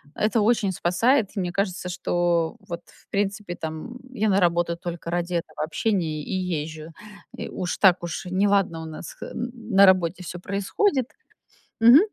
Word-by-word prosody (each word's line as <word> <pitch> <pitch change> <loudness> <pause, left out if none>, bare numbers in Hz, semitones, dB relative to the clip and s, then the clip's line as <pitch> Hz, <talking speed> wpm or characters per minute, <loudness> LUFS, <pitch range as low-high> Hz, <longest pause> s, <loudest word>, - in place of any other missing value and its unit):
Это 220 +1 +1
очень 215 -3 +2
спасает, 200 +7 +2
и - - -1
мне 175 -1 -1
кажется, 185 -2 -2
что 175 -1 0
вот, 170 0 -5
в - - -22
принципе, 200 -2 -2
там 160 +10 -6 0.2
я 215 -3 +1
на 195 0 +4
работу 170 -1 +2
только 170 -1 -6
ради 175 0 -1
этого 160 -2 -2
общения 160 -3 -1
и - - -7
езжу. 160 -3 -3 0.4
И - - -6
уж 180 -1 -3
так 180 -3 +5
уж 170 +2 -4
неладно 190 -3 +2
у - - -6
нас 160 +1 -8
х - - -9
м, 240 +1 -4 0.2
на 200 +1 +9
работе 185 -1 +3
всё 175 0 -6
происходит, 240 - 0 0.7
мгм. 240 +6 +9
180 Hz, 170 wpm, -25 LUFS, 170-205 Hz, 0.7 s, на